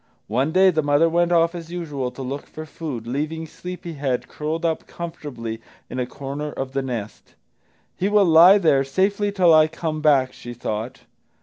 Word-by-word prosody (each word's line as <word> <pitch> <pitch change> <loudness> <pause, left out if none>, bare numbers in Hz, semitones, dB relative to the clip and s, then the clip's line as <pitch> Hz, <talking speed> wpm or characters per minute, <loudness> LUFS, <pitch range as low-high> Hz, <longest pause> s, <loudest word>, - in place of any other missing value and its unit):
One 130 +8 +1
day 185 +2 +5
the 160 -2 +1
mother 145 +2 +3
went 175 +1 +1
off 170 0 +3
as 170 -1 -8
usual 150 -7 -3
to 135 - -8
look 135 +3 -5
for 155 - -8
food, 150 -8 -6
leaving 155 +6 -3
Sleepy 180 +1 -8
head 130 -4 -2
curled 160 +3 -4
up 160 -1 -1
comfortably 140 -10 -6 0.3
in 130 - -4
a 125 - -1
corner 140 +3 -5
of 135 -2 -5
the 135 0 -1
nest. 120 -5 -6 0.6
"He 195 - 0
will 205 -1 +4
lie 170 +4 +8
there 155 -8 +3
safely 200 +8 0
till 180 -4 +4
I 155 0 +6
come 160 -1 -4
back," 135 -4 +3
she 120 0 -9
thought. 110 +1 -4
155 Hz, 185 wpm, -22 LUFS, 135-170 Hz, 0.6 s, lie